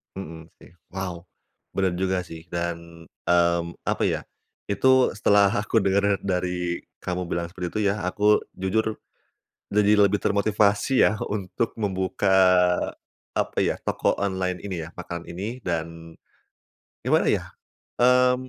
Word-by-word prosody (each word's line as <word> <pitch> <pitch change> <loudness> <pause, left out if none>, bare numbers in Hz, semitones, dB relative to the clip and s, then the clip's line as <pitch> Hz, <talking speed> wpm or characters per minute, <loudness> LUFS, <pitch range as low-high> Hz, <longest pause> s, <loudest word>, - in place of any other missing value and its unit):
Mhm, 80 -4 -8
sih. - - -16 0.2
Wow, 90 -3 -5 0.5
bener 95 -2 +1
juga 95 -1 0
sih. 80 -1 -11
Dan, 85 -1 -5 0.2
mmm, 85 -1 +2
apa - - -1
ya, - - -1 0.5
itu 130 +6 +4
setelah 100 -1 +4
aku 105 +2 +1
dengar 100 +1 +2
dari 90 -2 -1 0.2
kamu 90 0 -3
bilang 85 0 -2
seperti 90 -1 -4
itu 110 - +1
ya, 105 0 -4
aku 105 +3 +3 0.2
jujur 110 +4 0 0.8
jadi 105 0 +4
lebih 100 +1 +2
termotivasi 105 +4 +2
ya, 110 - +1
untuk 105 +2 -2
membuka, 95 -1 -1 1.1
apa - - -1
ya, - - 0
toko - - 0
online 95 -2 -1
ini 90 -5 -4
ya, 80 - -10
makanan 85 -1 -6
ini 100 +8 -5
dan 85 -1 -4 0.9
gimana, - - +3
ya, - - -1 0.5
eee, 125 +1 +5
95 Hz, 130 wpm, -25 LUFS, 85-105 Hz, 1.1 s, eee